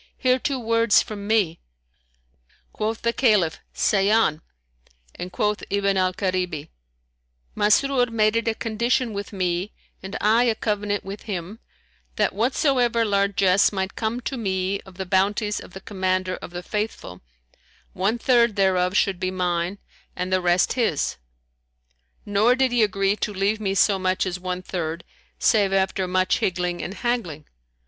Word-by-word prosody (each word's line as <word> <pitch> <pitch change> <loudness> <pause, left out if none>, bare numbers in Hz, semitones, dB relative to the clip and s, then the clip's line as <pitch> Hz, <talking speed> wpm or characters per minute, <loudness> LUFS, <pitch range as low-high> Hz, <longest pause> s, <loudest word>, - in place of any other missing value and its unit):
Hear 255 0 +2
two 275 +1 -1
words 230 -1 +3
from 205 -2 -7
me." 205 -7 +1 1.1
Quoth 220 +1 -3
the 235 0 +1
Caliph, 210 -11 +2
"Say 195 -1 +2
on," 215 -8 +2 0.7
and 180 +1 -7
quoth 210 +2 -1
Ibn 200 -1 +1
al 185 -1 +2
Karibi, 180 -5 -2 0.9
"Masrur 245 +4 +3
made 215 -1 +2
it 230 0 0
a 225 - +1
condition 235 +2 0
with 200 0 -5
me 185 0 -2 0.3
and 190 +3 -6
I 225 +4 +3
a 230 -2 +2
covenant 205 -1 -2
with 195 +1 -7
him, 190 +3 -5 0.6
that - - +1
whatsoever 240 0 +1
largesse 200 -2 +3
might 190 -1 -3
come 230 +2 -2
to 265 +2 -4
me 190 -2 -1
of 190 - -14
the 190 - -4
bounties 205 +3 +1
of - - -12
the 190 - -9
Commander 185 -1 -1
of - - -9
the 175 +1 -7
Faithful, 210 - -4 0.7
one 200 +6 0
third 235 -2 +3
thereof 190 -1 +2
should 195 -3 +1
be 185 0 -1
mine 180 0 -1 0.4
and 180 +1 -3
the 185 - +2
rest 175 0 +2
his; 225 - 0 1.1
nor 210 +4 +3
did 260 -1 +2
he 245 -1 +2
agree 195 -1 +2
to 210 - -2
leave 200 +2 0
me 195 -2 -1
so 195 0 +3
much 185 0 0
as 180 -1 -3
one 180 0 -4
third, 170 -2 -4 0.3
save 205 -3 +3
after 190 -1 0
much 185 0 +1
higgling 180 -1 -1
and 190 - -5
haggling. 205 -13 -2
200 Hz, 155 wpm, -23 LUFS, 185-220 Hz, 1.1 s, words